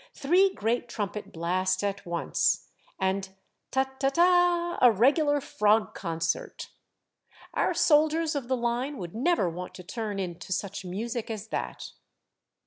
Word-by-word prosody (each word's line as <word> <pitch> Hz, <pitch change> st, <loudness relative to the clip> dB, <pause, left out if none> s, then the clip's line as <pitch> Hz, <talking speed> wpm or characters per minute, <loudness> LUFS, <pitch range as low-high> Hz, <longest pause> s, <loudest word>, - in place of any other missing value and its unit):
Three 360 Hz, +7 st, +3 dB
great 235 Hz, -, -1 dB
trumpet 210 Hz, -2 st, -4 dB
blasts 185 Hz, +3 st, 0 dB
at 200 Hz, -2 st, -3 dB
once, 170 Hz, 0 st, 0 dB, 0.3 s
and 190 Hz, 0 st, 0 dB, 0.2 s
* -, -, -52 dB
Ta^ 265 Hz, 0 st, -1 dB
ta^ 270 Hz, 0 st, +2 dB
ta 345 Hz, +1 st, +3 dB
— -, -, -17 dB
'a 245 Hz, -, +8 dB
regular 290 Hz, -, +3 dB
frog 210 Hz, -4 st, +2 dB
concert! 165 Hz, -2 st, -3 dB, 0.8 s
Our -, -, +1 dB
soldiers 315 Hz, +1 st, +3 dB
of 280 Hz, -5 st, -3 dB
the 260 Hz, 0 st, +1 dB
line 240 Hz, +4 st, -1 dB
would 175 Hz, -5 st, -7 dB
never 275 Hz, -, +2 dB
want 180 Hz, +2 st, -6 dB
to 180 Hz, -, -9 dB
turn 215 Hz, +1 st, -4 dB
in 180 Hz, -3 st, -4 dB
to 190 Hz, -, -10 dB
such 195 Hz, +1 st, -3 dB
music 225 Hz, +6 st, -4 dB
as 220 Hz, -1 st, -5 dB
that! -, -, -4 dB
225 Hz, 150 wpm, -28 LUFS, 190-285 Hz, 0.8 s, a